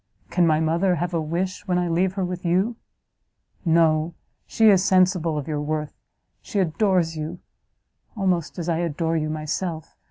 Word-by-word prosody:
Can 175 -2 +3
my 155 -1 +3
mother 170 +4 +2
have 175 +2 -3
a 165 - +1
wish, 175 +6 -3
when 180 -1 +1
I 180 0 0
leave 180 +3 +1
her 190 -2 -1
with 180 +1 -5
you? 190 +7 +1 0.9
No; 165 -1 +2 0.3
she 225 - +3
is 190 -3 +5
sensible 185 -4 +3
of 145 - -4
your 150 -2 -2
worth, 150 0 -3 0.5
she 210 - -6
adores 180 -2 +1
you, 155 +3 -5 0.8
almost 185 -5 0
as 170 -2 -4
I 165 -1 0
adore 165 0 -1
you 155 -1 -1
myself! 155 +1 -4
170 Hz, 165 wpm, -23 LUFS, 160-185 Hz, 0.9 s, is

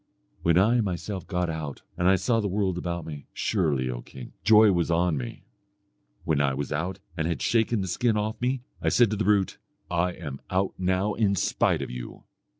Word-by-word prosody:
When 85 0 +3
I 115 +6 +4
myself 95 0 -4
got 90 -2 -1
out, 80 -4 -5
and 90 - +1
I 95 - +6
saw 115 +5 +1
the 105 - 0
world 95 -1 0
about 85 -2 -3
me, 75 -3 -8
surely, 75 -11 0
O - - -4
king! 60 0 -11
joy 110 +2 +7
was 85 -2 +1
on 85 0 +2
me. 60 -4 -6 0.8
When 75 -3 +1
I 70 -2 +1
was 70 0 -4
out 85 +5 -2 0.2
and 80 -2 -1
had 85 - -1
shaken 115 -1 +2
the 95 - -3
skin 110 +5 +1
off 105 +2 -2
me, 125 0 0 0.2
I - - +2
said 120 -4 +4
to - - 0
the 105 - -1
brute, 100 -3 +2 0.3
'I 90 +1 +1
am 75 -7 -7
out 95 +1 0
now 95 +3 +1
in 100 -3 +2
spite - - +1
of - - -6
you.' 60 -1 -8
90 Hz, 205 wpm, -26 LUFS, 80-105 Hz, 0.8 s, joy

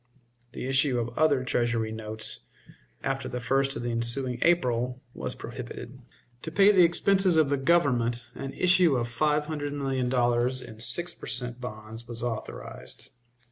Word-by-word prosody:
The - - -5
issue 135 0 +2
of 120 0 -3
other 145 -4 +3
Treasury 120 -3 0
notes, 110 0 -4 0.6
after 135 -1 -2
the 125 - -4
1st 135 +2 +1
of 115 - -4
the 120 - -1
ensuing 120 +2 0
April, 125 -7 +2
was - - -5
prohibited. - - -8 0.4
To 160 - -6
pay 195 +5 +6
the 185 -3 +6
expenses 185 +1 +3
of 155 -3 +4
the 140 - +2
Government 125 -6 +2
an 135 -1 -6
issue 180 -5 +4
of 120 -1 0
five 150 +5 +1
hundred 145 -2 -4
million 135 -3 -1
dollars 120 0 +2
in 110 -1 -11
six 175 +9 -2
per - - -11
cent. 125 0 -3
bonds 110 0 -8
was 115 -1 -4
authorized. 110 - -6
125 Hz, 160 wpm, -27 LUFS, 120-150 Hz, 0.6 s, pay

